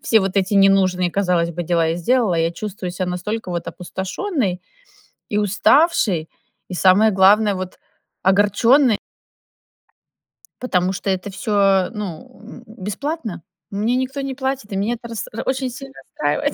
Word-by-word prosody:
все 220 -2 +4
вот 195 +1 -2
эти 195 +1 +1
ненужные, 190 -2 +3
казалось 180 -3 +1
бы, 175 +1 -4
дела 170 -1 +1
я 165 - -1
сделала, 210 0 +1
я 165 0 +1
чувствую 185 -1 -6
себя 185 0 -3
настолько 195 +3 -4
вот 170 -1 -3
опустошённой 190 - -3 0.7
и 210 - -1
уставшей, 205 - +3 0.4
и - - -4
самое 195 +5 +5
главное 200 +2 +5
вот 185 -1 -6 0.5
огорчённой. 210 +6 +4 1.7
Потому 185 -6 +1
что 195 - -4
это 190 +2 -2
всё, 195 -4 +2
ну, 200 -5 -7
м, 235 +1 -12
бесплатно. 220 - -5 0.3
Мне 215 +5 0
никто 260 +2 -2
не 270 -1 -4
платит, 265 -5 -3
и - - -3
меня 215 +5 0
это 235 0 -11
рас 230 - -5
это 225 - -5
очень 260 0 -1
сильно 270 +2 -10
расстраивает. 150 - -2
200 Hz, 150 wpm, -20 LUFS, 185-235 Hz, 1.7 s, самое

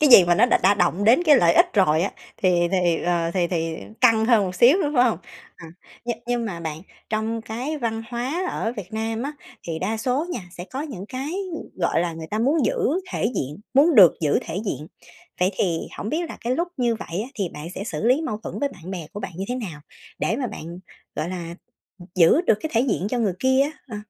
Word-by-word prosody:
cái 300 - +5
gì 190 -7 +10
mà 175 0 +3
nó 240 - +5
đã - - +3
đã 200 +2 +5
động 180 +1 +1
đến 245 +10 +5
cái 300 -5 +6
lợi 170 -7 +4
ích - - +4
rồi 165 -5 +4
á, 195 - 0 0.3
thì 175 -2 +2
thì, 175 -3 +2
ờ, 170 -1 0
thì 175 -2 +2
thì 165 -2 -2 0.2
căng 225 -3 +5
hơn 225 -4 +4
một 185 -1 -4
xíu 250 - +6
nữa, 295 - 0
phải 250 -1 +5
hông? 220 -9 +1 0.4
Ờ, 165 - -11 0.4
nh - - 0 0.2
nhưng 240 -1 0
mà 175 -6 -5
bạn, 160 -1 -5 0.3
trong 220 +1 -1
cái 255 +8 -4
văn 225 -2 -2
hóa 260 +9 -2
ở 225 - -2
Việt 205 -1 -7
Nam 225 +1 -2
á, 285 - -3 0.3
thì 160 -1 -3
đa 215 +5 -1
số 260 +7 -1
nha 240 - -3
sẽ 175 0 -8
có 265 +7 -6
những 235 - -7
cái, 265 +4 -4 0.2
ưm, - - -5
gọi 170 -2 +1
là, 170 -1 -1
người 160 0 -7
ta 215 - -1
muốn 275 +5 +2
giữ - - +1 0.4
thể - - -1
diện, 145 +8 -3
muốn 300 +4 +5
được 190 - +9
giữ 150 -3 +2
thể - - -6
diện. 155 -4 -3 0.5
Vậy 185 - +3
thì 170 -4 0 0.2
hổng 210 - -4
biết 330 +4 -2
là - - -7
cái 245 +2 -1
lúc 345 +1 -1
như 240 -3 +1
vậy 200 -2 -4
á, 245 - -7
thì 195 -5 -2
bạn 150 +2 -7
sẽ 200 - -5
xử 220 - -4
lý 260 +5 +4
mâu 215 -9 -2
thuẫn - - -6
với 285 - +1
bạn 180 -6 -11
bè 175 -5 -5
của 205 - -6
bạn - - -6
như 190 - -3
thế 250 - -1
nào 180 -12 -6 0.4
để 225 - 0
mà 260 -2 -2
bạn, 170 -3 -8 0.4
gọi 155 +4 -2
là, 170 -2 -5 0.4
ừm, 175 +1 -13
giữ 180 - +5
được 225 - +2
cái 315 - -4
thể 230 - +4
diện 215 -7 0
cho 250 - 0
người 205 -6 +1
kia 260 +1 +3
á? 290 - -1 0.2
Ờ. 215 - -6
215 Hz, 250 wpm, -23 LUFS, 175-250 Hz, 0.5 s, gì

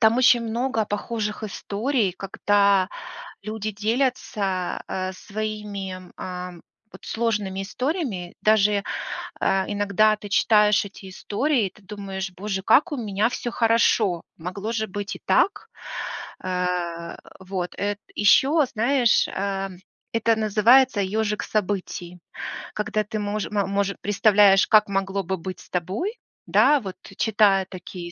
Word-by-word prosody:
там 220 +1 +5
очень 245 -2 +5
много 230 0 -1
похожих 210 0 -3
историй, 215 +1 -1
когда 200 0 +2 0.5
люди 215 0 -4
делятся, 210 -4 -1
э, 185 0 -3
своими, 210 -1 -5 0.2
эм, 180 -1 -6 0.3
вот - - -13
сложными 210 -4 -1
историями. 245 - -3
Даже, 210 -1 +4 0.6
э, 195 0 +2
иногда 205 +1 +3
ты 205 -1 -9
читаешь 210 0 +4
эти 195 -1 -11
истории, 230 +4 0
и - - -5
ты - - -20
думаешь: 195 -1 -5
"Боже, 190 0 -3
как 310 - +4
у - - -1
меня 215 -2 0
всё 240 - -4
хорошо! 225 -6 +2
Могло 195 +6 -5
же 220 -1 -1
быть 200 +1 -5
и - - -15
так!" 395 - +2 0.8
Э, 180 -2 -2 0.2
вот, 185 -1 -4
э 205 0 -1 0.2
ещё, 275 +9 +5
знаешь, 240 +1 +2
эм, 195 -1 -3 0.3
это 230 0 +2
называется 220 +3 +4
"ёжик 210 +2 -1
событий", 185 -4 -3 0.6
когда 215 0 -1
ты 215 +1 -4
мож 205 0 -2
ма 205 -2 +1
может 200 0 -1
представляешь, 205 -1 +5
как 215 -2 +5
могло 195 0 -1
бы 190 +2 -2
быть 185 +1 -7
с - - -18
тобой, 200 - -2 0.3
да, 295 -1 +5
вот, 190 -4 -6 0.2
читая 205 -3 +3
такие 180 -2 -8
205 Hz, 130 wpm, -24 LUFS, 190-220 Hz, 0.8 s, там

